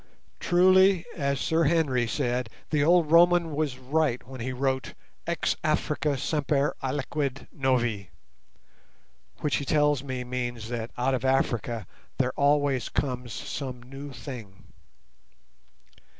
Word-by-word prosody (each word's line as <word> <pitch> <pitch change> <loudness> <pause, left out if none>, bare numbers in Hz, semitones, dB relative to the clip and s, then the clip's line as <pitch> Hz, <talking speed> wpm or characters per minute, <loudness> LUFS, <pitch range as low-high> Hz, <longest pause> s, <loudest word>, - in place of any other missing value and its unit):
Truly, 185 0 +5
as 140 -4 -1
Sir 160 +2 +2
Henry 140 -7 +2
said, 125 -2 -1 0.2
the 150 -2 +2
old 165 -1 +4
Roman 170 0 +5
was 145 -4 -1
right 130 -1 0
when 130 -2 -8
he 130 +2 -2
wrote 130 0 -2 0.3
"Ex - - 0
Africa 145 -2 0
semper 145 +1 0
aliquid 140 0 -2
novi", 120 -8 0 1.3
which 145 -6 +1
he - - -3
tells 145 -1 +2
me 130 -2 -4
means 120 -2 -4
that 115 -1 -3
out 130 +2 +1
of 130 -1 -1
Africa 120 -4 0 0.3
there 130 -1 +1
always 145 -2 +2
comes 125 -3 -2
some 125 +2 -5
new 135 +3 -9
thing. 120 -6 -10
135 Hz, 120 wpm, -27 LUFS, 125-150 Hz, 1.3 s, Truly